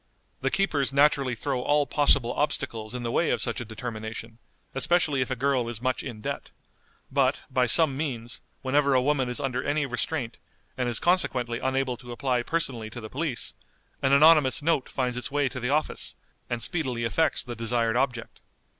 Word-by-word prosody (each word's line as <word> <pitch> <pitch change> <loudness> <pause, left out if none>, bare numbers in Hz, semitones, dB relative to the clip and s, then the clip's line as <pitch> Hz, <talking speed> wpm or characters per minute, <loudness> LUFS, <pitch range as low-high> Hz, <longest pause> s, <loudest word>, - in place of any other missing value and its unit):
The - - +1
keepers 150 -9 +1
naturally 140 -3 +3
throw 130 +1 -2
all 145 +2 +2
possible 140 -4 +3
obstacles 115 -6 -2
in 125 - -4
the 115 - -2
way 170 - +2
of - - +1
such 115 -1 -1
a - - -5
determination, 110 0 -7 0.3
especially 150 0 +2
if 130 - -1
a 130 - -1
girl 125 -2 +1
is 120 -2 -5
much 130 +1 -1
in 115 -5 -7
debt; - - -4 0.6
but, - - +2
by 125 -1 +2
some 145 +2 +4
means, 120 -6 -4 0.2
whenever 140 +1 +3
a 130 - +4
woman 135 -3 +1
is 125 - -1
under 130 -2 -1
any 145 +1 0
restraint, 125 -1 -3 0.4
and 125 -2 -1
is 120 - +1
consequently 125 -10 +2
unable 130 -1 -1
to 120 -1 -11
apply 125 0 0
personally 120 -6 -2
to 115 - -8
the 110 -2 -9
police, 145 -4 -2 0.5
an 135 - +2
anonymous 150 -1 +6
note 160 -4 +1
finds 125 -2 -2
its 125 - -4
way 145 0 +1
to 125 - -6
the 125 +1 -2
office, 150 +2 0 0.3
and 120 -1 -2
speedily 130 -8 -1
effects 155 +8 +1
the 120 -1 -6
desired 115 0 0
object. 125 -2 -2
130 Hz, 185 wpm, -27 LUFS, 120-145 Hz, 0.6 s, anonymous